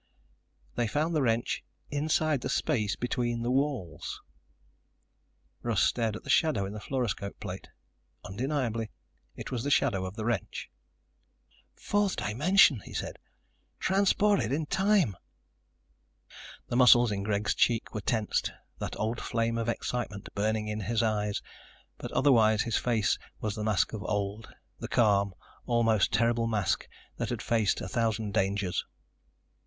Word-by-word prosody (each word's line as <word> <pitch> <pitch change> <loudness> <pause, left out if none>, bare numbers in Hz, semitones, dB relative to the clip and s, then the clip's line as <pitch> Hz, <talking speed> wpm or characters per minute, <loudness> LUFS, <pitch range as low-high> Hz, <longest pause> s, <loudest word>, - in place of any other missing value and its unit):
They 120 -1 0
found 155 +8 0
the 155 - +2
wrench 115 -2 0 0.3
inside 155 -1 +1
the - - -3
space 110 -10 0
between 120 -1 -1
the 120 - 0
walls! 130 - -2 1.4
Russ 115 -5 +1
stared 115 -3 +1
at - - -8
the - - -11
shadow 140 - +3
in 100 - -6
the 105 - -6
fluoroscope 110 -5 -3
plate. - - -7 0.6
Undeniably 115 -1 -2 0.5
it - - -7
was 120 -2 -2
the 145 - -1
shadow 120 -9 +2
of 95 - -8
the 110 -2 -4
wrench. 115 -6 -2 1.0
"Fourth 205 -1 0
dimension," 145 - +4
he - - -10
said. - - -4 0.6
"Transported 195 - +2
in 150 +3 0
time." 190 - +2 1.5
The - - -3
muscles 120 -2 +7
in 100 -1 -2
Greg's 105 0 0
cheeks 115 -2 +1
were 105 - -3
tensed, 110 0 0 0.3
that - - -4
old 115 +2 -1
flame 115 0 -1
of 115 0 -1
excitement 115 -4 -3
burning 110 +1 0
in 105 0 -3
his 115 +2 0
eyes, 105 -2 0 0.6
but - - -6
otherwise 110 -6 +4
his 115 - -1
face 115 -4 +1 0.2
was 105 -2 -2
the 105 - -4
mask 105 -1 +1
of 110 - -4
old, 105 +2 -2 0.3
the - - -5
calm, 100 -4 +2 0.3
almost 115 -4 +3
terrible 115 +2 +2
mask 105 -5 0 0.3
that - - -2
had - - -3
faced 110 -4 +1
a - - -4
thousand 110 -2 -1
dangers. 100 -2 0
115 Hz, 140 wpm, -29 LUFS, 105-130 Hz, 1.5 s, muscles